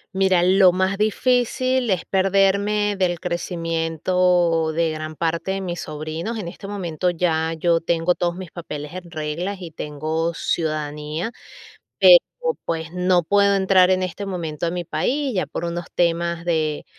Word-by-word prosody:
Mira, 190 -2 +3
lo 185 0 +5
más 190 +1 0
difícil, 250 +3 +1
es 185 -3 +1
perderme 200 +2 +2
del 175 -3 0
crecimiento, 170 -1 0
de 165 0 +1
gran 155 0 -6
parte 165 +3 -1
de 195 0 -2
mis 175 -2 -4
sobrinos. 155 +8 -5
En 190 -6 -4
este 195 +3 -10
momento, 180 -4 -2
ya 165 -2 0
yo 165 +1 +2
tengo 165 +1 +1
todos 175 -1 -1
mis 185 -3 -8
papeles 150 -4 -7
en 180 -1 -8
regla, 165 +4 -3
y 175 -3 -8
tengo 155 +2 -3
ciudadanía. 155 +3 -2 0.7
Pero, - - +9 0.5
pues, 165 0 -3
no 180 0 +2
puedo 200 +4 +3
entrar, 190 -1 +4
en 185 0 +2
este 185 +2 -4
momento 170 -4 -3
a - - 0
mi 175 0 -4
país. 275 - -1
Ya 185 - 0
por - - -5
unos 170 0 -4
temas 170 0 0
de 155 -3 -1
175 Hz, 155 wpm, -22 LUFS, 165-190 Hz, 0.7 s, Pero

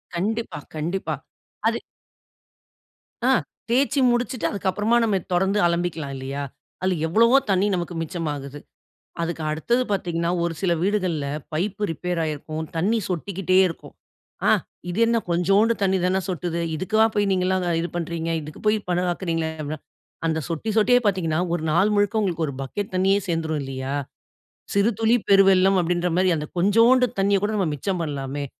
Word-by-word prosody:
கண்டிப்பா, 220 +1 -2 0.2
கண்டிப்பா 170 +6 -2 0.6
அது - - +1 1.5
ஆ - - +4 0.4
தேய்ச்சு 270 +3 +2
முடிச்சுட்டு 245 +1 -1
அதுக்கு 195 -2 -2
அப்புறமா 220 +5 +2
நம்ம 215 -3 +1 0.2
தொறந்து 190 +3 +2
அலம்பிக்கலாம் 170 -5 -2
இல்லையா? 135 +2 -4 0.4
அதில 185 -2 +1
எவ்வளவோ 230 +9 +5
தண்ணீ 195 +1 +3
நமக்கு 175 0 -4
மிச்சமாகுது. 145 -4 -4 0.6
அதுக்கு 165 -1 -3
அடுத்தது 235 +11 +1
பார்த்தீங்கன்னா, 170 -3 -1
ஒரு 170 - 0
சில 185 -3 +2
வீடுகள்ல 185 -7 0 0.3
பைப்பு 200 +6 -1
ரிப்பேர் 175 +2 -2
ஆயிருக்கும். 155 +1 -4
தண்ணீ 210 +7 +2
சொட்டிக்கிட்டே 185 +1 -1
இருக்கும். 165 - -10 0.5
"ஆ - - +6 0.4
இது 185 - -4
என்ன? 230 0 +2
கொஞ்சோண்டு 195 +7 +3
தண்ணீ 190 -1 +2
தானே 190 +1 +2
சொட்டுது. 170 -1 -2 0.2
இதுக்காலாம் 220 +5 +2
போய் 205 -1 +2
நீங்கல்லாம் 185 0 +1
இது 170 - -2
பண்றீங்க? 165 -1 -3
இதுக்கு 150 +1 -10
போய் 215 0 +4
பணம் 180 +1 +1
ஆக்குகிறீங்களே?" 165 -3 -2
அப்ன 150 +1 -4 0.5
அந்த 160 -1 0
சொட்டி 170 +7 -3
சொட்டியே 245 +3 +5
பார்த்தீங்கன்னா, 175 -4 +1
ஒரு 170 -2 -1
நாள் 195 +6 +3
முழுக்க 205 -4 +1
ஒரு 140 - -5
பக்கெட் 200 +9 -5
தண்ணீயே 195 +2 +3
சேர்ந்துரும் 160 -2 -1
இல்லையா? 135 +1 -4 0.8
"சிறு 205 +4 +4
துளி 225 +2 +4
பெருவெள்ளம்" 195 -1 +5
அப்டின்ற 175 +1 0
மாரி 185 0 +3
அந்த 150 0 -4
கொஞ்சோண்டு 230 +7 +5
தண்ணீய 200 0 +3
கூட 210 - +1
நம்ம 190 - +1
மிச்சம் 180 +5 -2
பண்ணலாமே. 140 -1 -4
180 Hz, 145 wpm, -23 LUFS, 165-205 Hz, 1.5 s, ஆ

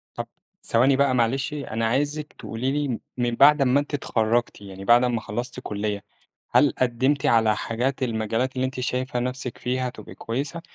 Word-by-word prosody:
طب - - -4 0.4
ثواني 130 +4 +3
بقى 140 -2 +3
معلش، 125 +4 +1
أنا 115 -6 -3
عايزِك 145 +5 -1
تقولي 125 +4 -3
لي 140 -5 -1 0.2
من 120 -1 0
بعد 150 +3 +6
ما 135 +1 +4
أنتِ 145 +1 -5
اتخرجتِ، 115 -4 0
يعني 95 -1 -9
بعد 120 +1 +6
ما 120 -2 0
خلّصتِ 120 +4 -5
كلية، 105 -3 -3 0.5
هل 145 - +4
قدّمتِ 130 +3 +1
على 110 -2 +4
حاجات 125 +6 -2
المجالات 115 +2 -1
اللي 130 0 0
أنتِ 130 0 -5
شايفة 125 +1 -2
نَفْسِك 125 0 -3
فيها 125 0 -1
تبقي - - -11
كويسة، 140 +8 -4
125 Hz, 170 wpm, -24 LUFS, 115-135 Hz, 0.5 s, بعد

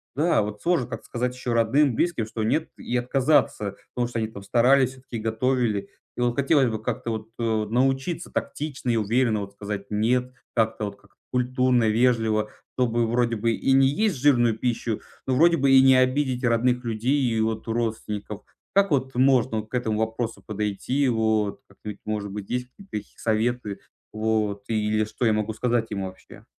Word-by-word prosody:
да, 155 -4 +2
вот 105 0 -6
сложно 170 -8 +1
как-то - - -7
сказать 125 +1 -2
ещё 125 -2 -3
родным, 120 +3 +3
близким, 155 -11 0
что 110 0 -4
нет, 155 +9 0
и 125 - -4
отказаться, 125 -5 +1 0.2
потому 120 -1 0
что 120 -1 -3
они 110 - -1
там 100 -3 -10
старались 130 +5 +4
всё-таки, 130 -3 -8
готовили. 110 -2 0 0.3
И 125 - -4
вот 120 -1 +1
хотелось 140 -2 +3
бы 110 - -3
как-то 120 -1 -3
вот, 110 -1 -4
э, 110 -2 0
научиться 135 +9 0
тактично 145 -4 -3
и - - +1
уверенно 115 +1 +1
вот 100 0 -7
сказать 100 0 -5
"нет". 125 +4 +1 0.2
Как-то 110 -2 +1
вот 100 0 -6
как-то 100 +3 -25 0.2
культурно, 125 -2 +2
вежливо, 110 -2 +2 0.3
чтобы 120 -2 +1
вроде 120 0 +1
бы 115 +2 +1
и 135 - 0
не 135 0 +6
есть 195 +2 +1
жирную 120 -5 +3
пищу, 115 -2 -2 0.2
но 130 - 0
вроде 170 +4 +5
бы 135 0 +3
и 130 0 +8
не 130 -1 +6
обидеть 130 0 +1
родных 125 +1 +2
людей 120 +5 0
и 115 -4 +1
вот 110 0 -2
родственников. 110 -2 -3 0.3
Как 200 -2 +4
вот 130 -2 0
можно 130 -3 +3
вот 110 - -17
к - - -23
этому 115 -4 0
вопросу 110 +1 -2
подойти? 105 +6 -1
Вот 110 -3 0
как-нибудь, 100 +1 -9
может 105 -1 -3
быть, 100 -1 -6
есть 125 0 -2
какие-то 195 +8 -17
такие 105 -1 -6
советы, 110 -1 -1 0.3
вот, 110 -2 -1
или 110 -1 +1
что 115 +3 -3
я 110 - +4
могу 110 +1 -1
сказать 115 0 0
им 100 -2 -3
вообще? 95 0 -10
115 Hz, 185 wpm, -25 LUFS, 110-130 Hz, 0.3 s, и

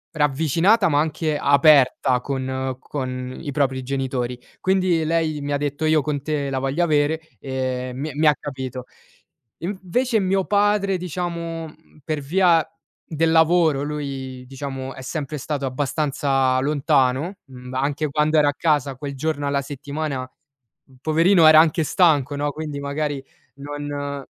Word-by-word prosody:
ravvicinata 160 - +3
ma 145 -2 +2
anche 155 0 -1
aperta 140 -3 +4
con 130 -1 -3
con 130 -2 -5
i 150 - -6
propri 135 -2 0
genitori. 130 -2 -3 0.2
Quindi 185 -3 +2
lei 160 -2 0
mi 145 0 -4
ha 145 - +1
detto: 145 +1 -2
"Io 155 -1 +3
con 145 -1 -2
te 145 -1 -2
la 135 - -1
voglio 135 +6 0
avere". 155 -1 +2 0.2
E 130 0 -3
mi 145 +4 -4
mi 155 +3 +2
ha 150 - +5
capito. 130 -3 -6 0.7
Invece 205 +7 -1
mio 190 0 +1
padre, 205 -1 +2
diciamo, 170 -2 -4 0.3
per 155 -2 -2
via 170 +2 +3 0.4
del 160 0 0
lavoro 160 -3 +4
lui 135 -3 -5
diciamo 135 0 -6
è - - -10
sempre 150 +2 -4
stato 145 0 -3
abbastanza 135 -1 0
lontano, 145 +3 +1
mhmm, 125 -2 -11
anche 145 +3 -1
quando 150 +2 +1
era 150 -1 +5
a - - -1
casa 145 -5 +1
quel 140 +1 -6
giorno 145 0 -2
alla 140 0 0
settimana, 140 0 -4
p - - -37 0.7
poverino 165 +3 +4
era 155 0 +9
anche 160 0 +3
stanco 150 -5 +2
no, 145 +1 -1
quindi 150 -2 -5
magari 140 0 -2 0.3
non 145 0 -5
145 Hz, 145 wpm, -22 LUFS, 135-160 Hz, 0.7 s, era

